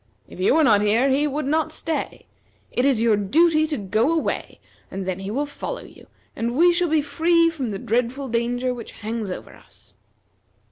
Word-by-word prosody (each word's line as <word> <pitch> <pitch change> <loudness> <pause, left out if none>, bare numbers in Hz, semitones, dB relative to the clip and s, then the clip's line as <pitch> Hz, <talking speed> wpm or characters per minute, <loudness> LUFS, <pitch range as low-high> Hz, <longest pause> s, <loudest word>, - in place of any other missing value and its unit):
If - - -13
you 190 +9 +3
were 320 - +4
not 210 -7 +5
here, 225 +6 +3
he 290 +3 +2
would 295 +1 -3
not 310 +2 0
stay. 320 -1 -4 0.5
It 250 - 0
is 255 -5 +2
your 225 -2 +4
duty 310 - +3
to 305 - -2
go 215 - +1
away 330 -2 -2 0.3
and 190 0 -5
then 185 0 -2
he 195 +1 -6
will 275 +7 -1
follow 395 +11 -6
you, - - -16 0.3
and 235 +2 -2
we 350 +2 +6
shall 345 0 +1
be 310 -1 +2
free 330 +3 +2
from 275 -7 -4
the 200 - -3
dreadful 245 +6 -1
danger 245 +2 -1
which 240 -2 -9
hangs 220 -1 -4
over 180 - -7
us." - - -18
255 Hz, 195 wpm, -23 LUFS, 220-310 Hz, 0.5 s, we